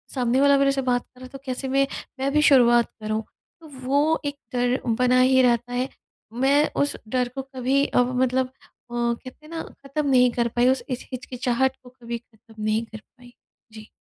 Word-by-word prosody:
सामने 250 0 +1
वाला 280 0 +5
मेरे 275 0 +3
से 275 0 -1
बात 250 -1 +1
कर 250 - -23
रहा 255 - -9
है - - -11
तो 275 - -9
कैसे 260 +1 -4
मैं, 275 +1 +2 0.3
मैं 270 +1 0
भी 300 - +4
शुरुआत 240 -5 +5
करूँ। 215 +1 -2 0.4
तो 320 - -13 0.2
वो 290 +5 +2
एक 285 0 -2 0.2
डर 245 +1 +1
बना 250 +2 +2
ही 260 +1 +5
रहता 245 -1 +1
है, 250 +2 -1 0.4
मैं 275 +5 +3
उस 285 - 0
डर 250 +2 0
को 270 - -2
कभी 265 +1 0
अब 250 +1 +1
मतलब 260 0 +1
अ, - - -24 0.4
कहते 240 +4 -3
हैं 310 - -14
ना, 330 -1 -4 0.2
ख़त्म 290 +2 -2
नहीं 250 -2 +5
कर 235 0 0
पाई, 240 +1 +1
उस 265 - +1
इच 255 -1 -4
हिचकिचाहट 255 +1 -1
को 250 - -13
कभी 235 0 -4
ख़त्म 225 -2 -14
नहीं 215 +2 0
कर 220 -1 -10
पाई। 245 +1 -20 0.4
जी। 215 -1 -11
255 Hz, 205 wpm, -24 LUFS, 240-270 Hz, 0.4 s, वाला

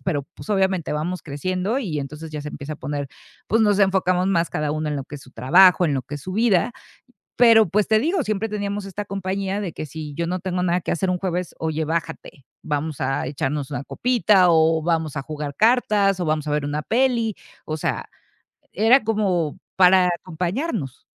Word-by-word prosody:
pero, 150 -7 -1
pues, - - -12
obviamente 190 -5 +1
vamos 170 +5 -2
creciendo 185 - -2
y 165 - -3
entonces 150 +3 -7
ya 150 - -5
se 150 - -6
empieza 150 +1 -6
a - - -13
poner, 140 0 -4 0.4
pues, 225 +2 +3
nos 210 -2 +3
enfocamos 185 -1 +2
más 170 -5 +1
cada 150 +1 -1
uno 155 0 -2
en 150 - -2
lo 140 - -3
que 145 +2 -9
es - - -12
su 130 - -17
trabajo, 180 +9 +5
en 145 -4 +1
lo 130 - -2
que 140 - -8
es 145 - -6
su 185 - -6
vida. 215 -2 +2 0.7
Pero, 225 -4 +6
pues, 205 +4 +1
te 220 - +4
digo, 330 - +1
siempre 215 0 -1
teníamos 205 -1 -3
esta 195 +2 -5
compañía 195 0 -3
de 185 -6 -4
que 155 - -6
si 150 0 -7
yo 170 +3 -2
no 180 +2 -1
tengo 180 0 -2
nada 180 0 +1
que - - -3
hacer 185 +2 0
un 180 - +1
jueves: 180 -2 -3
"Oye, 160 0 -2
bájate, 165 -4 -4 0.2
vamos 150 0 -3
a 135 +2 -1
echarnos 140 +1 -3
una 140 - -3
copita 210 - +3
o 160 -1 +3
vamos 160 -3 -1
a 135 - -3
jugar 150 -2 -6
cartas 210 -4 +3
o 175 - -1
vamos 155 -1 0
a - - -1
ver 150 0 0
una 145 +1 -3
peli", 235 -2 +1 0.3
o 155 - -3
sea, 155 - -2 0.7
era 225 +5 +4
como 190 -8 0 0.2
para 185 -1 +6
acompañarnos. 175 - -3
175 Hz, 205 wpm, -22 LUFS, 150-200 Hz, 0.7 s, Pero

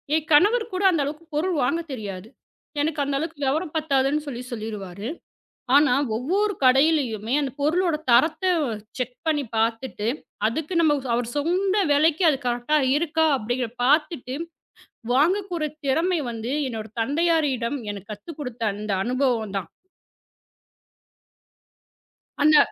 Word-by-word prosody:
என் 315 -1 -1
கணவருக்குக் 425 +6 +4
கூட 370 - -1
அந்த 330 -5 +1
அளவுக்குப் 310 +3 -7
பொருள் 350 +4 0
வாங்கத் 330 +5 -1
தெரியாது. 205 -5 -6 0.5
"எனக்கு 300 0 -1
அந்த 280 0 -1
அளவுக்கு 310 -2 -5
விவரம் 305 +4 -1
பத்தாதுன்னு" 290 -1 +1
சொல்லிச் 250 -2 -6
சொல்லிருவாரு. 210 -3 -6 0.7
ஆனா, 290 -2 +5 0.2
ஒவ்வொரு 390 - 0
கடையிலயுமே 255 -5 +3
அந்தப் 275 0 -5
பொருளோட 340 +2 +2 0.2
தரத்தை 320 +9 +4 0.5
செக் 250 0 -3
பண்ணிப் 290 -7 -1
பாத்துட்டு 225 -1 -1 0.4
அதுக்கு 305 +9 -3
நம்ம 305 -3 +4 0.2
அவர் 235 0 0
சொன்ன 375 +6 +1
விலைக்கு 315 +4 +3
அது 275 - +1
கரெக்ட்டா 245 +5 +1 0.2
இருக்கா 320 +1 +1
அப்படிங்கிறது 245 +1 -3
பாத்துட்டு, 290 -2 +1 0.8
வாங்கக்கொற 350 +4 +1 0.2
திறமை 330 +6 +1
வந்து 230 +2 -5 0.2
என்னோட 220 -3 -5
தந்தையாரிடம் 285 -2 +1
எனக்குக் 205 +1 -9
கத்துக் 280 +10 -11
கொடுத்த 250 -4 -6
அந்த 210 +1 -5
அனுபவம் 240 -4 0
தான். 190 - -5 2.7
அந்த 305 0 +7
285 Hz, 120 wpm, -24 LUFS, 240-320 Hz, 2.7 s, அந்த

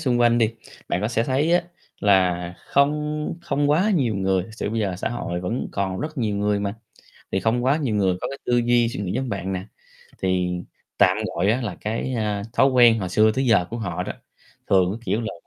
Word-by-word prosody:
xung 125 -6 +1
quanh 120 0 +4
đi, 115 0 +2 0.3
bạn 90 - 0
có 105 - 0
sẽ 115 -1 0
thấy 140 +5 +1
á, 175 0 +4 0.4
là 90 -3 +2
không 150 +2 +1
không 145 -1 0
quá 185 +8 +3
nhiều 125 - +1
người, 95 -1 +1
thực 110 +4 -12
sự 105 - -3
bây 115 0 -1
giờ 95 -3 -1
xã - - -2
hội 90 -7 -4
vẫn 110 +7 -3
còn 95 -2 -2
rất 155 -1 -5
nhiều 105 -4 0
người 105 0 +1
mà, 100 0 -2 0.6
thì 95 - +1
không 120 +2 +1
quá 135 +3 +3
nhiều 135 -9 -1
người 95 -3 +2
có - - -3
cái 140 - -7
tư 120 - +2
duy, 120 0 +3
suy 115 - -5
nghĩ 95 -2 -2
giống 130 +4 -2
bạn 95 -3 -3
nè, 95 0 -3 0.6
thì 90 -1 +1 0.5
tạm 95 +1 +5 0.2
gọi 95 +5 +2
á 120 - +1
là 105 -7 -4
cái, 115 +4 -2
a, 105 -3 -1
thói 135 - +4
quen 120 -3 +6
hồi 90 - -2
xưa 110 +4 +4
tới 135 +1 0
giờ 105 -6 +4
của 115 - -4
họ 90 -5 -3
đó, - - -4 0.6
thường 95 -2 +4
cái, 110 - -6
kiểu 110 - 0
là 115 - -4
110 Hz, 235 wpm, -23 LUFS, 95-125 Hz, 0.6 s, quen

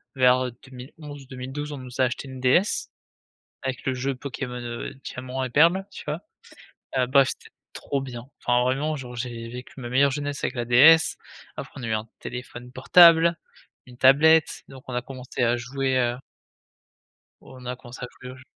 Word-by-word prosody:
vers, 130 0 +4
heu, 125 - -4
2011-2012 135 +2 -9
on 145 - -6
nous 130 0 -10
a - - +5
acheté 130 +2 -2
une 130 -1 -9
DS 130 +10 +2 0.7
avec 130 -2 -4
le 130 - +1
jeu 135 +2 -2
Pokémon, 125 -2 -6
heu, 120 -1 -6
Diamant 130 +1 -5
et 130 - -3
Perle 170 +9 +4
tu - - -10
vois? 150 +4 -3 0.8
Heu, 125 -1 +2
bref, 135 +1 +4
c'était - - -8 0.2
trop 140 -1 -3
bien, 125 -1 -8 0.2
enfin 125 0 +3
vraiment 140 +5 0
genre 125 -2 -8
j'ai 120 -1 -5
vécu 125 +3 -10
ma 120 - -6
meilleure 135 +3 +3
jeunesse 145 0 -4
avec 130 - -2
la 120 -1 -2
DS, 150 +7 +6 0.4
après - - -7
on - - -8
a - - -3
eu 110 - -1
un 110 +1 -3
téléphone 125 0 -8
portable, 170 +4 +6 0.5
une 125 -1 -15
tablette, 150 +5 +5
donc 130 -1 -13
on - - -5
a 125 - -1
commencé 130 0 -7
à 120 0 +3
jouer, 130 +2 -1
heu 120 -1 +1 1.2
on 130 -1 -13
a 125 - -3
commencer 120 0 -10
a - - -7
jouer 125 0 -8
au - - -12
j 130 - -16
130 Hz, 185 wpm, -25 LUFS, 125-140 Hz, 1.2 s, DS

